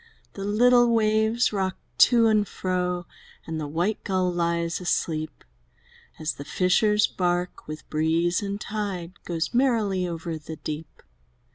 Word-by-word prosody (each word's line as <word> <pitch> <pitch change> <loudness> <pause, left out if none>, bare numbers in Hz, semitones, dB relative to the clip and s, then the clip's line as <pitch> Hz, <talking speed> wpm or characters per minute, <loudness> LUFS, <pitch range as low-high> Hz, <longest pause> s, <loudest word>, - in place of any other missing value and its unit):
The 195 - -6
little 240 +4 +4
waves 220 +1 +2
rock 190 -2 -1 0.3
to 235 -2 +4
and 215 -2 +3
fro. 180 -1 -2 0.4
And 160 -1 -4
the 150 - -3
white 175 +8 -1
gull 185 -2 0
lies 170 0 -1
asleep, 155 -3 -2 0.7
As 155 -1 -2
the 140 - -8
fisher's 205 +6 +3
bark, 180 -1 -2
with 155 0 -8
breeze 165 +4 +1
and 200 0 -3
tide, 195 -5 -5
Goes 170 +3 -2
merrily 220 -8 +2
over 165 -1 -4
the 160 +1 -8
deep! 155 +1 -7
180 Hz, 135 wpm, -25 LUFS, 165-210 Hz, 0.7 s, little